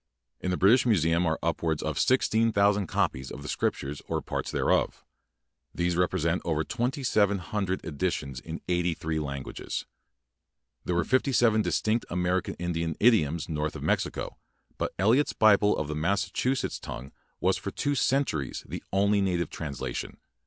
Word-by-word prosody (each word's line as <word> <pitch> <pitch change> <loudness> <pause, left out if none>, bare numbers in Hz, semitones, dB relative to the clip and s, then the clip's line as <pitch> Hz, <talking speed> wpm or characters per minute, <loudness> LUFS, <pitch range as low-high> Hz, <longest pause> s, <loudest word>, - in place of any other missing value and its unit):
In 90 - -3
the 90 - 0
British 120 +7 +5
Museum 85 -5 +3
are 80 0 +1
upwards 80 -2 0
of 80 -2 -2
16,000 105 -6 +3
copies 65 -3 -1
of 70 - -8
the - - -7
Scriptures 70 -1 -2
or - - -1
parts - - -4
thereof. - - 0 0.7
These 85 0 0
represent 90 -1 +1
over 80 -2 0
2,700 105 - 0
editions 75 -5 -2
in 80 +4 -7
eighty 90 -1 +1
three 80 -1 -2
languages. 70 -3 -5 1.0
There 90 - 0
were 85 - +2
fifty 130 - +2
seven 115 -4 +4
distinct 110 +6 0
American 90 +1 0
Indian 85 -2 -2
idioms 85 -9 +3
north 75 -1 -2
of - - -6
Mexico; - - -1 0.4
but - - -1
Eliot's 115 +10 +3
Bible 105 -1 +4
in 80 - -1
the 75 - -4
Massachuset 100 - 0
tongue 65 +3 -7 0.3
was - - +2
for - - -5
two 145 - -1
centuries 125 - 0
the - - -6
only 100 +1 +3
native 90 -3 0
translation. 70 -5 -5
90 Hz, 145 wpm, -28 LUFS, 80-105 Hz, 1.0 s, British